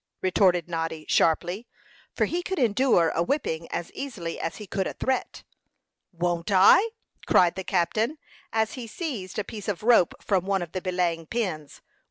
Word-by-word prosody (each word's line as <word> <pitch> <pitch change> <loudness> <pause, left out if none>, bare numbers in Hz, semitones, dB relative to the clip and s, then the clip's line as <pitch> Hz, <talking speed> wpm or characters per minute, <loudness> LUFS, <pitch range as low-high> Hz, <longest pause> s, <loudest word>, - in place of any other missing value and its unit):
retorted 180 -2 +3
Noddy, 165 -2 -3
sharply, 175 +7 +1 0.5
for - - +2
he 350 - -2
could 380 +1 -4
endure 235 - +3
a 165 - -1
whipping 170 - -1
as 170 - -4
easily 205 -12 -5
as 165 - -3
he 210 - -8
could 195 0 -2
a - - -4
threat. 260 -1 -2 0.7
"Won't 170 0 -2
I?" 200 - +6 0.4
cried 175 -2 +5
the 190 +1 -5
captain, 215 - 0 0.3
as 220 0 0
he 245 -3 -7
seized 225 - -5
a 210 - 0
piece 210 0 -8
of 205 -1 -3
rope 230 -7 +4
from 190 -2 0
one 195 -2 +1
of 170 - -9
the 185 - -4
belaying 175 -3 -1
pins. 180 -11 -4
190 Hz, 170 wpm, -26 LUFS, 170-225 Hz, 0.7 s, I